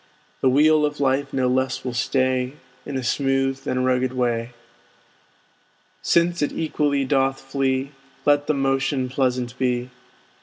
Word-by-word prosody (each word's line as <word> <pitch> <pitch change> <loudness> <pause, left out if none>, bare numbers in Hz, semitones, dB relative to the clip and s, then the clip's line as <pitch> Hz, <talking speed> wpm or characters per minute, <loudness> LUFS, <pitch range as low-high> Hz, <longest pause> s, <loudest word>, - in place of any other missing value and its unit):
The 130 - +4
wheel 150 +3 +4
of 150 0 -1
life 135 0 +1
no 130 -1 +1
less 130 +1 0
will 125 - -3
stay 130 +1 0 0.3
In 140 - -3
a 130 - -3
smooth 135 +1 0
than 130 0 0
rugged 130 0 +1
way: 120 -2 -1 1.5
Since 170 0 +2
it 145 - +1
equally 145 -3 0
doth 135 0 +1
flee, 135 0 -1 0.3
Let 145 0 +3
the 155 - +1
motion 135 -1 0
pleasant 125 -2 -1
be. 125 -1 -1
135 Hz, 140 wpm, -23 LUFS, 130-140 Hz, 1.5 s, The